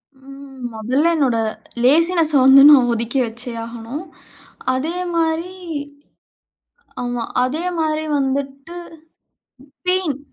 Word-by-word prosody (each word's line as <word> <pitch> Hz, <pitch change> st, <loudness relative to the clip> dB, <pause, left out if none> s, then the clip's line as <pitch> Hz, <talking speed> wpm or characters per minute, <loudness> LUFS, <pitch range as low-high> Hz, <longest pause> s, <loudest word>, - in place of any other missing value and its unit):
ம். 270 Hz, 0 st, -13 dB
மொதல்ல 255 Hz, +9 st, 0 dB
என்னோட 265 Hz, -7 st, +1 dB, 0.5 s
லேசினஸ்ஸ 325 Hz, +4 st, +5 dB
வந்து 265 Hz, +1 st, +8 dB
நான் 255 Hz, -4 st, +5 dB
ஒதுக்கி 235 Hz, +3 st, -2 dB
வச்சே 235 Hz, +2 st, -7 dB
ஆகணும். 235 Hz, +6 st, -7 dB, 0.7 s
அதேமாரி, 335 Hz, +3 st, -2 dB, 1.5 s
ஆமா. 245 Hz, -1 st, -3 dB, 0.2 s
அதே 300 Hz, +7 st, -3 dB
மாரி 310 Hz, -1 st, -1 dB
வந்துட்டு 275 Hz, +4 st, -4 dB, 1.1 s
பெயின். 365 Hz, -7 st, 0 dB
275 Hz, 85 wpm, -19 LUFS, 255-320 Hz, 1.5 s, வந்து